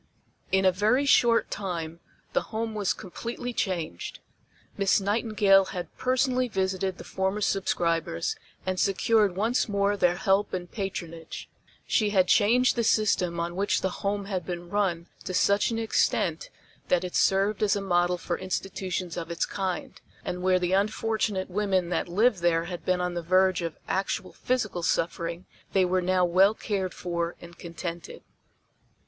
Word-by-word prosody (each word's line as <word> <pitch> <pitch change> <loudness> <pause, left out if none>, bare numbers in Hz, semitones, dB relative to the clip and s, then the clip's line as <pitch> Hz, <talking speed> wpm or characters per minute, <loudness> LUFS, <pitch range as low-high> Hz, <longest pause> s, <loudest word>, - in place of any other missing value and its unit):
In 190 0 +3
a 185 - +6
very 215 +9 +2
short 235 -4 +4
time 170 -4 -4 0.3
the - - +2
Home 225 0 -3
was 205 -3 0
completely 240 +6 -5
changed. 170 - -3 0.6
Miss 200 +1 +3
Nightingale 200 -1 +3
had 180 -2 -6
personally 255 0 +1
visited 190 -3 -1
the - - -9
former 190 +2 -2
subscribers, 170 - 0 0.3
and 185 0 -1
secured 205 0 +2
once 225 +4 +1
more 200 0 +1
their 180 -3 +2
help 195 +1 +1
and 175 -1 -6
patronage. 170 -5 -6 0.3
She 215 -2 +2
had 190 -3 +3
changed 240 +6 +4
the 235 - 0
system 185 -6 +2
on 170 +1 -3
which 200 +2 +1
the 190 - -2
Home 200 0 -1
had 190 -3 -3
been 175 -1 -6
run 185 -5 0 0.2
to 185 - -3
such 200 +2 +3
an 230 - -2
extent 225 - 0 0.4
that 270 - +2
it 180 - -5
served 195 +2 +2
as 210 -1 +3
a - - -1
model 180 -2 +1
for 175 0 -3
institutions 185 -2 -3
of 165 -1 -4
its 170 0 -1
kind, 190 -3 -4 0.2
and 180 - -3
where 185 0 +3
the 180 0 -1
unfortunate 210 -1 0
women 190 -3 0
that 180 - -1
lived 205 +4 +2
there 170 -1 +2
had 175 0 -6
been 185 -1 +1
on 180 0 -1
the 175 - -3
verge 185 +1 +3
of 165 -2 -4
actual 190 +1 -2
physical 215 -8 -1
suffering, 170 +1 -1 0.3
they 190 -2 +4
were 185 +1 +1
now 180 0 +2
well 190 +4 +4
cared 195 -5 -2
for 170 -1 -3
and 170 0 -13
contented. 170 0 -7
190 Hz, 160 wpm, -27 LUFS, 175-205 Hz, 0.6 s, a